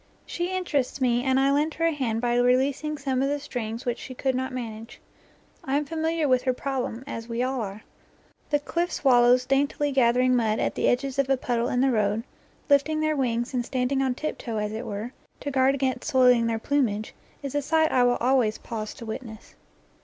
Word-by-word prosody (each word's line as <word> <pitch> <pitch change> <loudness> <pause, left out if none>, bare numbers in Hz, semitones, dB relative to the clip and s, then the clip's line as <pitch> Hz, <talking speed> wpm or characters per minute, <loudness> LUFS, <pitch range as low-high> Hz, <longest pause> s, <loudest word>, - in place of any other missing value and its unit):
She 350 +1 -3
interests 285 -8 -1
me 245 -2 +2
and 265 0 +2
I 275 +1 +3
lend 300 +3 +1
her 330 - 0
a 330 - +3
hand 240 -7 -2
by 240 -1 +1
releasing 265 +5 +1
some 265 -2 -1
of 275 - +1
the 290 - 0
strings 235 -5 -5
which 240 -1 -2
she 255 - -8
could 265 +1 0
not 260 +1 -2
manage. 225 -3 -7 0.6
I 270 +1 0
am 295 - -1
familiar 320 +1 -1
with 255 -2 +3
her 255 0 +1
problem, 255 -2 -3
as 230 -4 -7
we 235 +1 -1
all 260 -1 -1
are. 205 0 -6 0.7
The 295 - +3
cliff 340 +4 -2
swallows 250 -2 +4
daintily 285 +1 +1
gathering 250 -1 +3
mud 220 -3 +1
at - - 0
the - - 0
edges 270 +2 0
of 275 -1 +1
a 270 - +3
puddle 240 -1 -1
in 250 - +1
the 265 0 +3
road, 210 -1 +1 0.4
lifting 300 +2 +3
their 310 0 +1
wings 240 -2 -1
and 245 -1 0
standing 260 +2 -1
on 260 -2 0
tip 310 +4 -4
toe 230 -3 -4
as 210 0 -2
it 225 +3 -5
were, 215 +4 -5 0.3
to 285 - -4
guard 265 0 +3
against 265 +2 -2
soiling 250 -4 +4
their 225 -1 0
plumage, 225 -5 -1 0.3
is 275 - -4
a 290 - +1
sight 315 +2 +2
I 255 - +3
always 245 -2 +2
pause 215 -2 -6
to 230 - -9
witness. 220 -1 -8
255 Hz, 210 wpm, -26 LUFS, 235-280 Hz, 0.7 s, swallows